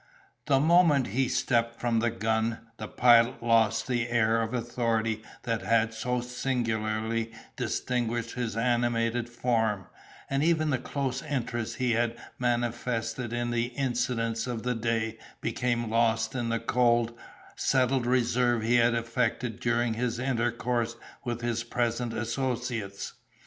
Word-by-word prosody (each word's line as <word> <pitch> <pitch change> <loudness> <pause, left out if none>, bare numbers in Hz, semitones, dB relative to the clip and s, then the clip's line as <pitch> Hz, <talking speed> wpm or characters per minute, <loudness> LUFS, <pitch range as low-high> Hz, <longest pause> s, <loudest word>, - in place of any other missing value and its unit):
The 135 -2 +4
moment 155 - +4
he 130 +5 +1
stepped 115 -2 0
from 120 -2 +1
the 120 +1 +2
gun, 110 0 0 0.2
the - - -5
Pilot 120 0 +4
lost 115 -1 +3
the 120 -2 -1
air 115 -1 +3
of 115 0 -2
authority 115 -2 -1 0.2
that 115 -1 -1
had 115 0 +2
so 125 +2 -1
singularly 115 -3 -1 0.2
distinguished 120 -1 -1
his 120 -3 -3
animated 120 0 +1
form, 115 -5 0 0.4
and 135 +1 0
even 155 -2 +2
the 130 - +1
close 135 0 -2
interest 120 -6 -3
he 125 -2 0
had 120 0 +1 0.2
manifested 120 0 -1
in 120 0 -1
the 120 0 +1
incidents 120 -2 -1
of 120 -3 -3
the 125 0 0
day 115 -1 -1 0.2
became 120 -1 -1
lost 115 -1 +2
in 120 -3 -2
the 115 0 0
cold, 120 -1 +2 0.4
settled 130 -1 +2
reserve 120 -1 +2
he 120 +2 +3
had 120 0 +4
affected 115 0 -1
during 120 -1 +1
his 120 +1 -1
intercourse 120 -2 -1 0.3
with 120 -1 -3
his 120 -1 -1
present 120 0 -1
associates. 115 -3 -3
120 Hz, 135 wpm, -28 LUFS, 115-125 Hz, 0.4 s, The